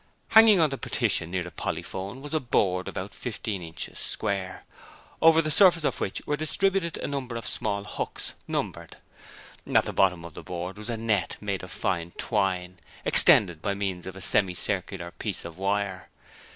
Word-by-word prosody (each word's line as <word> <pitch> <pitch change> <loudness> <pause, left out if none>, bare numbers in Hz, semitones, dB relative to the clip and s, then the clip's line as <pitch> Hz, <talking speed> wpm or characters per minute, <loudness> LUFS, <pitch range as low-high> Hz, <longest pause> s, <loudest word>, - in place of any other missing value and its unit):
Hanging 220 -3 +7
on 155 -3 +3
the 135 - -4
partition 80 - 0
near 90 0 -2
the 90 - -9
polyphone 100 +8 -5
was 145 - -7
a 155 - +2
board 95 - 0
about - - -5
fifteen 100 -4 -4
inches 80 -1 -7
square, 100 -3 -3 0.6
over 165 0 +6
the 155 - -1
surface 170 0 +6
of - - -1
which - - -3
were 150 - 0
distributed 170 +3 +1
a - - -4
number 135 -4 -4
of 115 -2 -5
small 100 -3 -2
hooks, - - -4
numbered. - - -4 0.7
At - - +4
the - - -4
bottom 90 -3 +2
of 85 - -10
the - - -9
board 90 +2 -6
was 105 +2 -7
a 115 - -2
net 110 -5 -1
made 100 -2 -3
of 95 - -9
fine 85 -2 -2
twine, 90 -4 -1 0.3
extended 85 -6 +6
by 100 +2 -1
means 95 -3 -3
of 95 - -7
a 95 - -10
semi 95 -1 +2
circular 90 -2 -3
piece 105 -3 -4
of 85 +1 -9
wire. 100 -1 -2
100 Hz, 180 wpm, -26 LUFS, 90-130 Hz, 0.7 s, Hanging